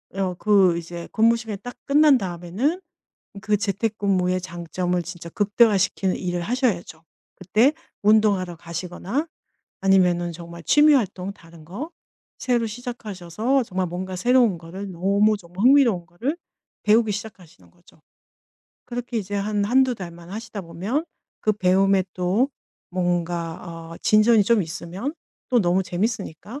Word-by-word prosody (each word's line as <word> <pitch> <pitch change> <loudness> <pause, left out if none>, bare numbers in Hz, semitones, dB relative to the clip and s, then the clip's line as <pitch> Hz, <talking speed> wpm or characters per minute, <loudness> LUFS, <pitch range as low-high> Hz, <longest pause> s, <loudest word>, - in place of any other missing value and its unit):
어 190 -2 -1
그 195 -5 +4
이제 170 0 -8
근무 230 +1 +4
시간이 225 -3 -6
딱 245 - -7
끝난 290 0 +5
다음에는 190 - -2 0.6
그 210 0 +1
재택근무의 200 -3 0
장점을 175 0 -2
진짜 170 -1 -8
극대화시키는 205 -1 +2
일을 175 -1 -2
하셔야죠. 195 - -1 0.3
그때 225 - +2 0.3
운동하러 205 -4 +3
가시거나 180 - -4 0.5
아니면은 180 -3 +3
정말 170 0 -10
취미 300 - +6
활동 200 -6 0
다른 165 -4 -16
거 240 - -6 0.5
새로 240 -2 +1
시작하셔서 225 +1 -2
정말 185 -4 -2
뭔가 185 +2 -5
새로운 240 -2 +3
거를 190 +4 -8
너무 200 +4 +2
정말 180 +4 -4
흥미로운 250 -10 +5
거를 255 - -3 0.5
배우기 215 0 +4
시작하시는 180 - -9
거죠. - - -24 0.9
그렇게 245 0 -5
이제 205 -1 -5
한 205 0 0
1-2 255 +3 +3
달만 170 -4 -9
하시다 215 0 -6
보면 190 - -3 0.4
그 215 - +2
배움에 195 0 +3
또 190 +9 +1 0.4
뭔가 175 -2 -1 0.4
어 - - -10
진전이 215 0 +5
좀 220 -1 +3
있으면 175 - -5 0.4
또 245 -3 +3
너무 180 +1 +2
재밌으니까 205 - -3
195 Hz, 300 characters per minute, -23 LUFS, 175-230 Hz, 0.9 s, 취미